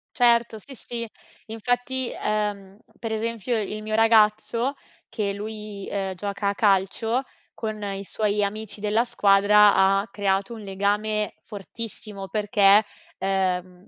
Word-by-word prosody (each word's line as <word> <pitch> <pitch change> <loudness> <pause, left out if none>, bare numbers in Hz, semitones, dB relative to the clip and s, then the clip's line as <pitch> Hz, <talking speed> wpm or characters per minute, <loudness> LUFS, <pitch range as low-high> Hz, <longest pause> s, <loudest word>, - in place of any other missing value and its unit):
Certo, 235 -2 +3
sì, 270 +5 -12
sì. 235 -1 -5 0.4
Infatti, 245 +3 -2
uhm, 205 -2 -2 0.2
per 225 -1 -4
esempio 230 +1 -1
il 215 +1 -4
mio 215 0 -3
ragazzo, 225 +3 +3 0.3
che 210 -3 -2
lui, 210 -1 -7
ehm, 195 -1 -2
gioca 200 +1 -2
a - - 0
calcio, 215 +5 +1 0.3
con 215 -2 -5
i 195 -1 -4
suoi 210 0 0
amici 210 +1 -4
della 215 +3 +1
squadra 205 -2 +5
ha 195 +2 +3
creato 200 0 0
un 220 - -8
legame 205 +2 -1
fortissimo, 205 -1 -8
perché 205 0 +4 0.3
uhm, 185 -1 -2
210 Hz, 125 wpm, -24 LUFS, 200-225 Hz, 0.4 s, squadra